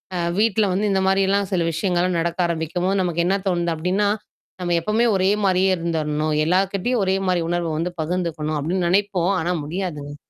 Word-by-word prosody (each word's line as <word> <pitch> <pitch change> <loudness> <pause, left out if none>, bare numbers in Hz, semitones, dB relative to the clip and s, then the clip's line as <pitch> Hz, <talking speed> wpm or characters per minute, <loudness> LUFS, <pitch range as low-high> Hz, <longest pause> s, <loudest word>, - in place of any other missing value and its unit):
அ, - - -1 0.2
வீட்ல 220 -1 +3
வந்து 205 +3 0
இந்த 190 0 +2
மாரிலாம் 195 0 +2
சில 180 - +1
விஷயங்கள்லாம் 175 +1 0
நடக்க 170 +2 -2
ஆரம்பிக்கும்போது, 175 +4 -1
நமக்கு 170 -1 0
என்ன 195 +2 +2
தோணுது 175 -2 0
அப்படின்னா, 185 +6 0 0.5
"நம்ம 175 -1 0
எப்பவுமே 220 +7 +1
ஒரே 190 0 +2 0.2
மாரியே 190 0 +3
இருந்துரணும். 155 -2 -1
எல்லார்கிட்டயும் 195 +6 +1
ஒரே 190 - +2
மாரி 180 -2 +1
உணர்வ 175 -1 -1
வந்து 175 +2 -2
பகிர்ந்துக்கணும்", 155 -2 -2
அப்படின்னு 175 +4 -1
நெனைப்போம். 195 -1 +1
ஆனா, 175 +2 -1
முடியாதுங்க. 150 -3 -5
180 Hz, 165 wpm, -22 LUFS, 165-195 Hz, 0.5 s, வீட்ல